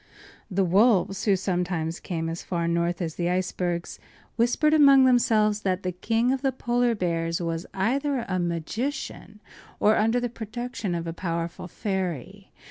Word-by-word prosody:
The 195 0 +1
wolves, 195 0 +3
who 200 -3 +4
sometimes 180 -3 -2
came 165 -2 -3
as 165 +1 -4
far 170 -2 -2
north 170 +1 0
as 160 -2 -3
the 175 0 0
icebergs, 180 -1 -2 0.4
whispered 245 +6 +2
among 275 -3 +7
themselves 215 -4 +3
that 190 -1 -1
the 180 - -1
King 225 +7 0
of 265 -1 -1
the 270 -1 +1
Polar 240 -1 0
Bears 165 -3 -1
was 165 0 -3
either 260 +6 0
a 185 -1 -1
magician 210 - -4 0.4
or 215 +1 +4
under 225 +3 +2
the 245 - -1
protection 230 -3 -5
of 170 0 -3
a 165 - -4
powerful 170 0 -4
fairy. 190 - -4
190 Hz, 155 wpm, -26 LUFS, 170-235 Hz, 0.4 s, among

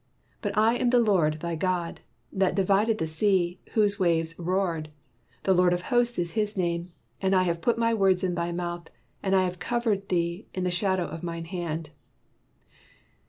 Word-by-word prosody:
But - - -3
I 225 +3 +4
am 245 - +1
the 250 - +4
Lord 170 -9 +2
thy 170 0 -2
God, 175 0 -2 0.3
that 190 -1 +1
divided 200 +3 +2
the 160 - -1
sea, 175 +2 +1
whose 205 -1 +2
waves 165 -3 +1
roared: 175 -3 -1 0.5
the 190 - +3
Lord 180 -1 +4
of 175 0 -2
hosts 240 0 +3
is 170 -1 -1
his 210 -2 -1
name. 175 -1 -1 0.3
And 190 0 +2
I 185 - +4
have 170 -2 -1
put 235 +4 +1
my 230 0 +2
words 190 -3 +3
in 180 -1 0
thy 170 0 -2
mouth, 175 -1 -4 0.3
and 195 0 +1
I 190 - +4
have 180 -1 -3
covered 225 -5 -1
thee 170 +2 -1
in 185 - -1
the 180 - 0
shadow 190 0 +1
of 160 +1 -7
mine 170 -1 -5
hand. 165 -3 -4
180 Hz, 185 wpm, -27 LUFS, 170-200 Hz, 0.5 s, I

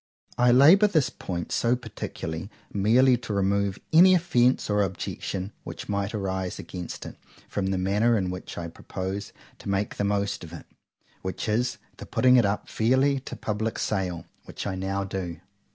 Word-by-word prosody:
I 125 0 +4
labour 160 - +7
this 155 -9 +1
point 85 -2 -5
so 120 +1 +2
particularly, 80 -6 -6 0.2
merely 120 +6 +4
to 115 -3 -5
remove 100 0 +1 0.2
any 185 +3 +8
offence 130 -8 +2
or 105 0 +2
objection 95 0 -3
which - - -7
might 100 +1 -2
arise 95 -2 -2
against 90 -2 -7
it - - -9 0.3
from 100 -2 -2
the 95 0 0
manner 105 +5 +2
in 95 -3 -1
which 90 0 -7
I 85 - -4
propose 95 +4 -5 0.3
to - - -7
make 100 +1 -1
the - - 0
most 100 -1 -1
of 85 0 -10
it;—which 95 +3 -9
is 115 +4 0 0.2
the - - -9
putting 130 0 +4
it 120 -4 +5
up 100 +1 -2
fairly 130 +5 +2
to 130 - -8
public 110 +1 -2
sale; 90 -4 -2 0.2
which - - -7
I 100 - -2
now 95 +1 -2
do. 95 -3 -5
100 Hz, 170 wpm, -26 LUFS, 95-120 Hz, 0.3 s, any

